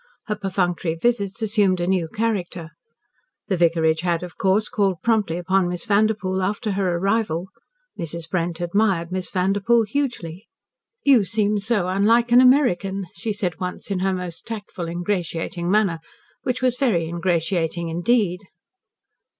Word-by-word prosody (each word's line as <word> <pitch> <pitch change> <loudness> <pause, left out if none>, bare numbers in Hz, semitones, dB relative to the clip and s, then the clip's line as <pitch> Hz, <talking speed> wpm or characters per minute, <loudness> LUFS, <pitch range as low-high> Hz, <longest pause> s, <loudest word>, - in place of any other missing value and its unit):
Her 210 - -2
perfunctory 185 -4 -1
visits 205 +2 -1
assumed 205 -4 +2
a 175 - 0
new 180 -2 +1
character. 185 -5 -3 0.8
The 190 - +2
vicarage 165 -2 +2
had, 175 -1 0
of 175 -2 -8
course, 195 +3 +1
called 195 -5 0
promptly 215 -8 +1
upon 185 +1 +1
Miss 175 -1 -3
Vanderpoel, 200 -2 +1
after 205 +3 -1
her 190 -3 0
arrival. 190 -2 0 0.5
Mrs. 165 -1 -4
Brent 170 0 -2
admired 175 -1 +1
Miss 185 0 -3
Vanderpoel 200 +5 +2
hugely. 215 - -3 0.6
"You 260 -6 +6
seem 210 +1 0
so 205 -3 0
unlike 225 +6 +3
an 245 +1 +8
American," 200 -8 +3
she 205 +6 -4
said 190 -5 -3
once 180 +2 -5
in 190 - 0
her 190 +1 +1
most 180 -2 -7
tactful, 205 -6 -6
ingratiating 175 -1 -2
manner 195 -5 +2 0.4
which 255 0 -2
was 250 -1 +2
very 220 - +1
ingratiating 170 0 -1
indeed. 180 +2 +1
190 Hz, 140 wpm, -22 LUFS, 175-215 Hz, 0.8 s, an